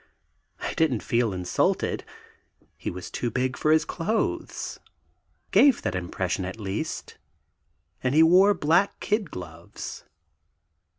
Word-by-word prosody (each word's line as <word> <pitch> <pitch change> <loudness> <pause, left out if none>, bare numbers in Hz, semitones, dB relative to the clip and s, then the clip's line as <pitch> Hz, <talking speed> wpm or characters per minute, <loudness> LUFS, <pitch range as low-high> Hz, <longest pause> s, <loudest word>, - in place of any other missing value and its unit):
I - - -3
didn't 140 -9 +1
feel 115 -2 +1
insulted. 90 -1 0 0.7
He - - -4
was 90 +1 -7
too 120 - -2
big 130 +2 -1
for 155 - 0
his 155 0 +4
clothes, 210 +7 -2 0.7
gave 280 -3 +5
that - - -1
impression 90 +1 -2
at 95 +5 -6
least, 100 -2 -4 0.8
and 130 +2 0
he 160 - +7
wore 190 +5 +6
black 175 +5 +2
kid 210 -4 0
gloves. 85 -3 -8
130 Hz, 120 wpm, -26 LUFS, -, 0.8 s, he